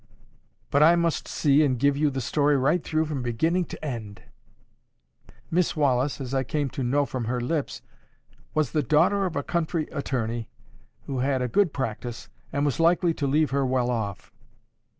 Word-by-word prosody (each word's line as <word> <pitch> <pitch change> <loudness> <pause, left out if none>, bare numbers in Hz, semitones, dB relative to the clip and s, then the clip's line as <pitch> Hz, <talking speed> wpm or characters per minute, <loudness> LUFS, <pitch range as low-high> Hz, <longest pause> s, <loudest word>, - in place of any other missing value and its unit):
But 140 - +3
I 165 +3 +7
must 170 -2 0
see 145 +1 +3
and 130 -4 +1
give 140 +3 +2
you 150 +1 +2
the 135 -1 -3
story 145 +3 +2
right 150 +6 +1
through 155 0 0
from 150 -4 -3
beginning 160 +10 0
to 155 - -8
end.—Miss 115 - -7
Wallis, 140 -2 +1
as 130 -1 -5
I 135 -1 +1
came 145 +1 -2
to 130 - -5
know 140 +4 +2
from 130 -3 -4
her 120 +3 -1
own 120 0 -2
lips, 155 -3 -2 0.7
was 155 -4 +1
the 155 - +1
daughter 180 - +3
of 170 - -6
a 145 - -1
country 165 -1 -1
attorney, 120 -6 -3 0.6
who 135 -2 -3
had 130 0 +1
a - - 0
good 175 - +2
practice, 120 -3 -5 0.2
and 140 +1 0
was 145 0 -1
likely 170 +1 +3
to 145 -3 -2
leave 150 +2 +2
her 140 0 +1
well 125 -1 +1
off. 105 -5 -4
140 Hz, 180 wpm, -25 LUFS, 125-155 Hz, 0.7 s, I